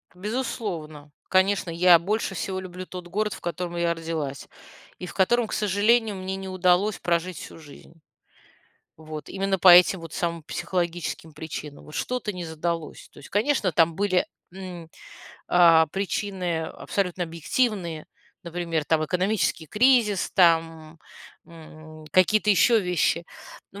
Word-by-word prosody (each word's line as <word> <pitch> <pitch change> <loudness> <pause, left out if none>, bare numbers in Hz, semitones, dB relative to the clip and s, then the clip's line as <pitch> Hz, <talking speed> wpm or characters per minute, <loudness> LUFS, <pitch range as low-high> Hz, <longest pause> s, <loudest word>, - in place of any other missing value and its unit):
Безусловно, 185 - -5 0.2
конечно, 190 -1 +2
я 170 +1 +5
больше 200 +3 -2
всего 190 +2 -3
люблю 185 0 -8
тот 180 -1 -9
город, 210 +4 -2
в - - -11
котором 175 +1 -4
я 170 0 +1
родилась, 160 -4 -5 0.5
и 180 - -7
в - - -9
котором, 230 +5 +2
к - - -7
сожалению, 210 +2 +2
мне 190 0 -4
не 195 0 -7
удалось 185 +2 +1
прожить 170 0 -1
всю - - -10
жизнь. 150 +1 -15 1.0
Вот 155 -2 -9
именно 195 0 -1
по 185 - +4
этим 180 +2 +7
вот 165 -1 -10
самым 170 -1 -2
психологическим 170 -1 -3
причинам, 150 -2 -8
вот 150 - -13
что-то 250 -4 -2
не 180 -2 -6
задалось. 160 0 -4
То - - -15
есть, 145 - -13
конечно, 210 -2 +1
там 165 +1 +3
были, 195 -2 +1 0.3
м, 180 -3 -9 0.6
а, 165 -2 +6
причины 190 -2 -2
абсолютно 180 +2 -3
объективные, 170 - -2 0.4
например, 170 -2 -3
там 155 0 +1
экономический 180 -1 0
кризис, 220 - +3
там, 165 -3 +2 0.5
м, 155 -1 -13
какие-то 210 +3 +3
еще 225 +3 +4
вещи, 175 -2 0 0.5
вот. 200 - -10
180 Hz, 140 wpm, -25 LUFS, 165-195 Hz, 1.0 s, этим